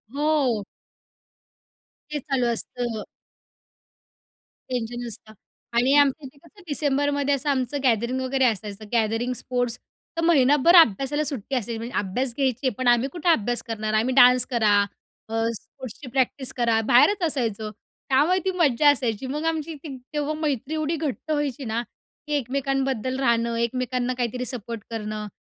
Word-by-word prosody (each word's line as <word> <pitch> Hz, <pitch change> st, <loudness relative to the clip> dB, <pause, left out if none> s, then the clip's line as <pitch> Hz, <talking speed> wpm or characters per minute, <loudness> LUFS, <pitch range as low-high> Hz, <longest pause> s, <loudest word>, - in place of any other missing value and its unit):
हो. 285 Hz, -8 st, +1 dB, 1.5 s
हे 295 Hz, -, -1 dB
चालू 265 Hz, -2 st, -1 dB
असतं. 235 Hz, -1 st, -4 dB, 1.7 s
टेन्शन 245 Hz, -1 st, -3 dB
नसतं 220 Hz, -1 st, -8 dB, 0.4 s
आणि 250 Hz, +3 st, +4 dB
आमच्या 285 Hz, +1 st, +2 dB
इथे 270 Hz, +2 st, -12 dB
कसं 405 Hz, +3 st, -19 dB
डिसेंबरमध्ये 285 Hz, -1 st, +1 dB
असं 280 Hz, +2 st, -3 dB
आमचं 270 Hz, 0 st, 0 dB
गॅदरिंग 240 Hz, +1 st, +1 dB
वगैरे 260 Hz, 0 st, +1 dB
असायचं. 215 Hz, -2 st, -2 dB
गॅदरिंग, 230 Hz, +2 st, +1 dB
स्पोर्ट्स, 245 Hz, -1 st, -2 dB, 0.4 s
तर -, -, +1 dB
महिनाभर 295 Hz, +1 st, +5 dB
अभ्यासाला 290 Hz, -, +5 dB
सुट्टी 275 Hz, -3 st, -3 dB
असायची. 235 Hz, -2 st, -2 dB
म्हणजे 230 Hz, +2 st, -6 dB
अभ्यास 235 Hz, +6 st, -2 dB
घ्यायचे 260 Hz, -1 st, +1 dB
पण 255 Hz, -, -1 dB
आम्ही 240 Hz, +2 st, +4 dB
कुठे 350 Hz, 0 st, -1 dB
अभ्यास 240 Hz, -6 st, +1 dB
करणार, 215 Hz, -1 st, -3 dB
आम्ही 230 Hz, +4 st, +1 dB
डान्स 250 Hz, -1 st, +7 dB
करा, 220 Hz, -4 st, +3 dB, 0.6 s
अ, 225 Hz, -, -4 dB, 0.2 s
स्पोर्ट्सची 260 Hz, +1 st, -11 dB
प्रॅक्टिस 260 Hz, 0 st, -1 dB
करा, 230 Hz, -2 st, +2 dB
बाहेरच 305 Hz, +11 st, +5 dB
असायचं, 225 Hz, -7 st, -2 dB, 0.4 s
त्यामुळे 300 Hz, +8 st, +3 dB
ती 380 Hz, -, +2 dB
मज्जा 295 Hz, -3 st, +4 dB
असायची. 245 Hz, -4 st, -2 dB
मग 300 Hz, +4 st, -3 dB
आमची 325 Hz, 0 st, -1 dB
ती 290 Hz, -4 st, -6 dB, 0.2 s
तेव्हा 295 Hz, 0 st, -1 dB
मैत्री 290 Hz, -1 st, -2 dB
एवढी 310 Hz, +1 st, -1 dB
घट्ट 310 Hz, 0 st, -4 dB
व्हायची 290 Hz, -3 st, -1 dB
ना 225 Hz, +1 st, -1 dB, 0.5 s
की 300 Hz, -, -3 dB
एकमेकांबद्दल 265 Hz, -1 st, -1 dB
राहणं, 235 Hz, -2 st, +1 dB
एकमेकांना 250 Hz, +1 st, -1 dB
काहीतरी 250 Hz, +1 st, -2 dB
सपोर्ट 230 Hz, -2 st, -6 dB
करणं. 215 Hz, -2 st, -4 dB
255 Hz, 140 wpm, -24 LUFS, 235-285 Hz, 1.7 s, डान्स